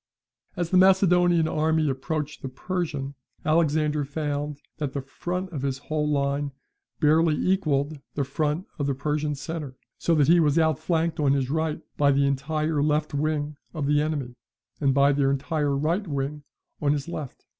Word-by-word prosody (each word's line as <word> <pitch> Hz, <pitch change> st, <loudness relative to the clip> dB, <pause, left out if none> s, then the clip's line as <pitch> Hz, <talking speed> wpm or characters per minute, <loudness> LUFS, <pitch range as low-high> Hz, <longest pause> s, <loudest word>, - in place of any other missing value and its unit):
As 175 Hz, -3 st, -2 dB
the 185 Hz, -, +4 dB
Macedonian 180 Hz, -3 st, +5 dB
army 160 Hz, 0 st, +1 dB
approached 150 Hz, +2 st, -3 dB
the 135 Hz, -, -4 dB
Persian, 145 Hz, -2 st, -3 dB, 0.3 s
Alexander 155 Hz, -1 st, +2 dB
found 145 Hz, 0 st, -3 dB, 0.2 s
that 145 Hz, -4 st, -3 dB
the 140 Hz, -, -2 dB
front 180 Hz, +7 st, -4 dB
of 145 Hz, -5 st, -4 dB
his 135 Hz, -1 st, -1 dB
whole 150 Hz, +1 st, -2 dB
line 140 Hz, 0 st, 0 dB, 0.5 s
barely 155 Hz, +1 st, +4 dB
equalled 155 Hz, -5 st, 0 dB, 0.2 s
the 145 Hz, -, +1 dB
front 150 Hz, +5 st, -1 dB
of 140 Hz, -, 0 dB
the 140 Hz, -, 0 dB
Persian 150 Hz, +1 st, -1 dB
centre, 145 Hz, -2 st, -6 dB, 0.2 s
so 170 Hz, -, +2 dB
that 145 Hz, -3 st, +4 dB
he 170 Hz, +1 st, +6 dB
was 150 Hz, -1 st, +3 dB
outflanked 160 Hz, +1 st, +1 dB
on 140 Hz, -2 st, +3 dB
his 135 Hz, -1 st, 0 dB
right 160 Hz, 0 st, -1 dB
by 145 Hz, -1 st, +4 dB
the 140 Hz, 0 st, +3 dB
entire 150 Hz, +2 st, 0 dB
left; 150 Hz, +1 st, +1 dB
wing 150 Hz, 0 st, -1 dB, 0.2 s
of 150 Hz, -3 st, -2 dB
the 145 Hz, +1 st, +3 dB
enemy, 145 Hz, -5 st, -2 dB, 0.5 s
and 135 Hz, -3 st, +2 dB
by 140 Hz, 0 st, +5 dB
their 140 Hz, -1 st, +2 dB
entire 140 Hz, +1 st, 0 dB
right 170 Hz, +8 st, 0 dB
wing 145 Hz, 0 st, -3 dB, 0.4 s
on 145 Hz, -1 st, +3 dB
his 145 Hz, 0 st, -3 dB
left. 155 Hz, -6 st, -7 dB
150 Hz, 165 wpm, -25 LUFS, 140-160 Hz, 0.5 s, he